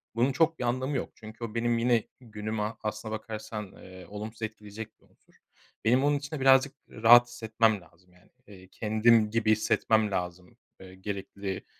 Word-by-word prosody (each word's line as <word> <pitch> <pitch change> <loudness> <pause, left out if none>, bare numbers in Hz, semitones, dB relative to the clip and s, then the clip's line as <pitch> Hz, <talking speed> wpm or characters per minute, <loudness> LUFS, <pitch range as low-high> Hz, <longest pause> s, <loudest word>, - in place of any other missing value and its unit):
bunun 125 +4 +2
çok 160 +3 +1
bir - - -2
anlamı 130 +3 -1
yok. - - -4
Çünkü 110 +1 -11
o 115 -1 -6
benim 120 0 +1
yine 115 -1 +2 0.2
günümü 110 -1 -4
aslına 110 +1 -4
bakarsan, 110 -2 -6
eee, 95 0 -12
olumsuz 110 +2 -8
etkileyecek 110 0 -7
bir - - -26
unsur. - - -31 0.5
Benim 125 +4 +4
onun 145 0 +3
için 140 +2 -6
de - - -5
birazcık 135 +1 +4
rahat 120 +2 +6
hissetmem 110 -3 0
lazım, 90 +2 -23
yani. 90 0 -25 0.2
Eee, 95 -2 -14
kendim 110 +2 +3
gibi 115 -1 +2
hissetmem 110 0 +2
lazım, 90 -1 -5 0.2
eee, 95 0 -12
gerekli, 100 0 -6
110 Hz, 170 wpm, -28 LUFS, 105-120 Hz, 0.5 s, rahat